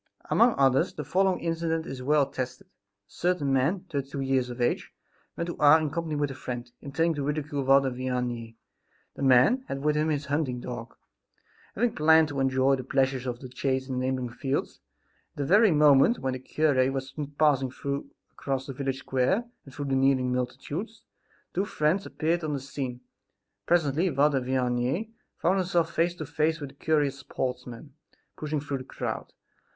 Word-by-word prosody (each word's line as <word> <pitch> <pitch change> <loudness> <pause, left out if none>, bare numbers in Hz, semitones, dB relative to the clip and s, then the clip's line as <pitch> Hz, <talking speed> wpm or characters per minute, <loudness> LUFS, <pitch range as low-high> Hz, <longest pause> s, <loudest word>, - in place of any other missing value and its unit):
Among 235 0 +5
others 135 -1 +3
the 150 - -4
following 190 +5 +1
incident 165 -1 -1
is 130 -1 -6
well 145 +2 +3
attested. 130 -2 -5
A - - -40 0.4
certain 165 - -1
man, 140 +9 +2
thirty 140 -7 -4
two; 140 - -5
years 135 -2 +1
of 120 0 -7
age, 120 - 0 0.5
went 170 - -1
to 175 - -5
Ars 150 +2 +7
in 155 -2 -2
company 165 -1 -3
with 145 -1 0
a - - -5
friend, 120 -2 -6
intending 165 +4 0
to 145 -2 -3
ridicule 145 -1 -2
Father 135 0 +4
Vianney. 125 -2 -3 0.6
The - - -8
man 135 - +5
had 135 0 -4
with 150 0 +2
him 155 +1 +1
his 150 -1 -1
hunting 140 -4 -1
dog, 120 -1 -7 0.8
having 235 +2 +1
planned 160 0 +5
to 140 -1 -4
enjoy 135 0 +3
the 130 - -5
pleasures 135 -1 0
of 120 -1 -4
the 130 - -7
chase 130 +1 -2
in 130 -2 -2
the 130 - -1
neighboring 130 -2 -1
fields. 135 +3 -3 0.6
At - - -26
the 140 - -1
very 205 +7 +6
moment 150 - +5
when 130 -1 -2
the 130 - -4
cure 135 -1 +1
was 135 0 -4 0.2
passing 135 -4 +3 0.6
across 135 -1 -3
the 135 - -6
village 135 0 -2
square 135 - +1 0.2
and 135 - -12
through 145 +2 -5
the 135 -1 0
kneeling 130 -1 +2
multitudes, 135 - -4 0.5
the 185 - +1
two - - -1
friends 175 +1 0
appeared 165 +2 -1
on 155 -1 -2
the 140 - -2
scene. 130 -2 -5 0.7
Presently 165 +1 +2
Father 140 -2 +2
Vianney 130 - -1 0.3
found 190 +3 +2
himself 170 -3 0
face 170 +1 +1
to 155 - -6
face 155 +3 0
with 145 -3 -6
the - - -23
curious 145 -3 +1
sportsman 125 0 -5 0.4
pushing 150 -1 -2
through 140 -1 -3
the - - -7
crowd. - - -5
140 Hz, 185 wpm, -27 LUFS, 130-155 Hz, 0.8 s, Ars